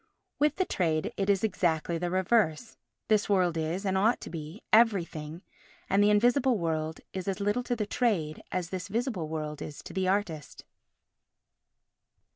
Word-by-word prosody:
With 295 +1 +3
the 375 - +1
trade 160 - 0
it 195 0 -1
is 195 0 +3
exactly 170 -5 0
the 175 +1 -1
reverse; 190 +1 +1 0.3
this 215 -1 +2
world 180 -4 +2
is, 165 +5 -2
and 190 -1 +1
ought 215 +5 +3
to - - -8
be, 165 +4 -7
everything, 175 -7 +2 0.5
and 200 +2 +4
the 205 - +5
invisible 245 +4 +3
world 160 -2 -2
is 190 0 -5
as 195 +1 -1
little 205 +4 +1
to 245 0 -2
the 215 -3 -2
trade 200 -10 0
as 180 -2 -3
this 185 +1 -4
visible 220 - -2
world 155 -1 -4
is 150 - -7
to - - -9
the 190 0 0
artist. 185 -7 -2
190 Hz, 165 wpm, -29 LUFS, 160-210 Hz, 0.5 s, the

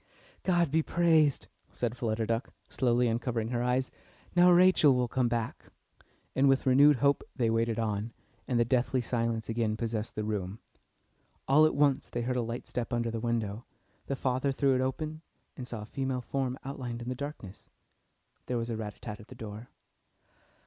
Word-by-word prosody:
"God 175 -5 +2
be 160 +2 +3
praised!" 160 -4 +3 0.3
said 120 -1 -2
Flutter 115 -2 -1
Duck, 115 +2 -1 0.2
slowly 125 -1 +2
uncovering 115 -1 -1
her 120 -1 -1
eyes. 125 +1 0 0.4
"Now 175 0 +7
Rachel 175 -6 +6
will 125 -1 +1
come 125 +1 +1
back." 115 -1 -3 0.7
And 135 +1 +4
with 135 +1 +2
renewed 140 +3 +6
hope 140 +2 +2
they 115 -4 +1
waited 115 0 +1
on, 110 0 -2 0.4
and 120 -2 +1
the 120 - +4
deathly 125 +1 +1
silence 115 -1 -1
again 110 -1 -1
possessed 110 -1 -3
the 105 - -2
room. 105 -2 -3 0.9
All 150 +3 +6
at - - -2
once 140 -2 +2
they 120 - -3
heard 125 +1 -1
a - - +1
light 115 +1 -4
step 125 0 -4
under 120 -1 0
the 115 - -3
window; 115 -2 -2 0.4
the 140 - -1
father 130 +1 0
threw 135 0 +2
it 130 - +1
open 155 +4 -3 0.3
and 125 - -7
saw 115 -4 -6
a - - -8
female 130 +2 -3
form 130 0 -2
outlined 125 -4 -5
in 120 - -5
the - - -1
darkness. 130 -8 -8 0.8
There 125 - -1
was 115 0 -3
a 115 - -2
rat 105 -2 -5
tat - - -28
tat 105 -3 -6
at 105 - -13
the 130 - -12
door. 110 0 -8
120 Hz, 185 wpm, -30 LUFS, 115-135 Hz, 0.9 s, Now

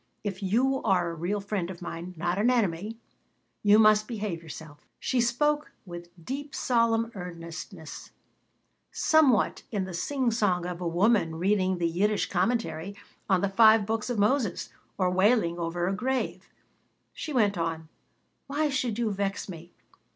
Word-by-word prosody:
If 200 -2 -4
you 250 +8 +1
are 175 -3 +1
a - - -6
real 175 +6 -2
friend 200 -3 -3
of 180 -2 -8
mine, 175 +1 -7
not 175 +3 -1
an 225 +4 +3
enemy, 215 -2 0 0.6
you 205 0 +6
must 215 -1 +5
behave 205 -7 -4
yourself." 155 -2 -11
She 255 -2 +1
spoke 295 +5 +1
with 175 -1 -9 0.2
deep, 280 +2 -5
solemn 230 -1 +1
earnestness, 170 -2 -8 0.8
somewhat 295 -9 +3
in 205 -4 -1
the 185 - -6
singsong 215 -4 0
of 180 0 -5
a 175 - -1
woman 175 -1 +2
reading 185 +1 +1
the 170 -1 +1
Yiddish 200 +5 0
Commentary 190 -3 -1 0.3
on 190 -2 +3
the 200 - +2
Five 220 +1 +6
Books 220 +2 -2
of 245 - -1
Moses 210 -2 +1 0.3
or 185 -2 +1
wailing 185 -2 +2
over 175 +1 -1
a 190 - 0
grave. 260 +6 -2 0.6
She 310 - -6
went 210 -7 +2
on: 165 -2 -3 0.6
"Why 295 +2 0
should 250 -5 -1
you 230 -3 0
vex 200 0 -2
me? 170 -2 -9
200 Hz, 150 wpm, -27 LUFS, 175-230 Hz, 0.8 s, you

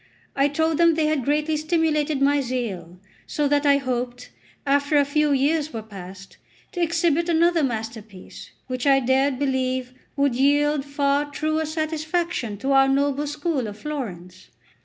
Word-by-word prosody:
I 275 +1 +3
told 320 +2 0
them 335 -1 +5
they 315 -1 +1
had 305 -3 0
greatly 300 +3 0
stimulated 310 -2 0
my 285 0 +3
zeal, 205 -9 -4 0.3
so 295 -1 0
that 290 +1 +1
I 280 0 +5
hoped, 250 -2 -4 0.3
after 285 +1 +2
a 285 - +4
few 300 +1 +1
years 290 +3 +1
were 225 -2 -5
passed, 195 -2 -11 0.3
to 355 - -4
exhibit 335 0 +1
another 340 0 +3
masterpiece, 220 -6 -6 0.2
which 255 +1 -3
I 270 -1 +5
dared 265 +1 +1
believe 260 -2 -1 0.2
would 280 -2 +1
yield 290 +2 +2
far 285 0 0
truer 310 +2 -1
satisfaction 315 - -2
to 270 - -1
our 270 0 +5
noble 280 +1 +1
school 295 -4 -2
of 205 0 -8
Florence. 185 - -7
280 Hz, 155 wpm, -23 LUFS, 255-305 Hz, 0.3 s, them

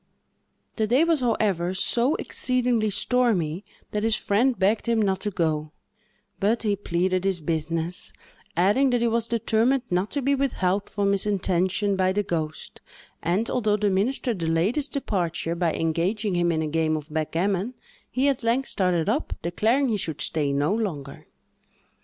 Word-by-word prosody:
The 220 -2 +1
day 255 +8 +4
was, 330 -2 +2
however, 200 -7 0
so 240 - +2
exceedingly 245 -4 0
stormy, 200 -6 +1 0.3
that 210 - -1
his 225 0 +2
friend 235 +6 +1
begged 210 +4 +1
him 230 -1 +2
not 195 -3 +1
to 210 - -2
go; 155 -4 -1 0.7
but 220 +4 +1
he 210 -2 +1
pleaded 185 -1 -1
his 190 -2 0
business, 165 +2 -2 0.5
adding 210 +10 +3
that 245 -1 +1
he 235 - +2
was 230 0 +1
determined 235 +3 +1
not 180 +3 +1
to 285 -2 -2
be 280 +2 +2
withheld 205 -8 0
from 200 -1 0
his 200 +1 +2
intention 190 0 +1
by 185 0 +1
the 205 +1 0
ghost, 160 -4 -4 0.4
and, 185 +7 0
although 215 -4 +1
the 205 -1 +1
minister 240 +6 0
delayed 165 +3 0
his 295 -2 0
departure, 175 - -2
by 170 -1 0
engaging 180 +7 -1
him 175 -1 +2
in 160 -1 0
a - - -2
game 155 0 0
of 150 0 -9
backgammon, 185 +8 -1 0.3
he 260 +2 +1
at 275 -3 +1
length 240 +3 0
started 180 -4 +1
up, 250 +9 0
declaring 225 - +1
he 215 -3 0
could 160 -4 -3
stay 150 -3 +1
no 145 +6 +1
longer. 155 -11 -4
200 Hz, 165 wpm, -25 LUFS, 170-230 Hz, 0.7 s, day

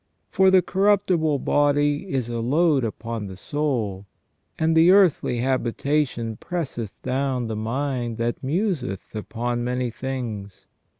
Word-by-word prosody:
" - - -48
For 190 0 +5
the 185 -1 +5
corruptible 185 -6 +2
body 145 +4 +1
is 130 -4 -1
a 120 -1 -3
load 145 +3 +2
upon 115 -1 -4
the 95 -1 -9
soul, 110 -8 -2 0.5
and 160 0 +2
the 165 +2 +6
earthly 180 -10 +4
habitation 130 -2 -1
presseth 140 - -5
down 130 -1 -1
the 110 -1 -3
mind 120 +1 -2
that 120 +2 -2
museth 145 - -2
upon 120 +3 -3
many 125 0 -1
things." 115 -6 -5
130 Hz, 130 wpm, -24 LUFS, 115-155 Hz, 0.5 s, the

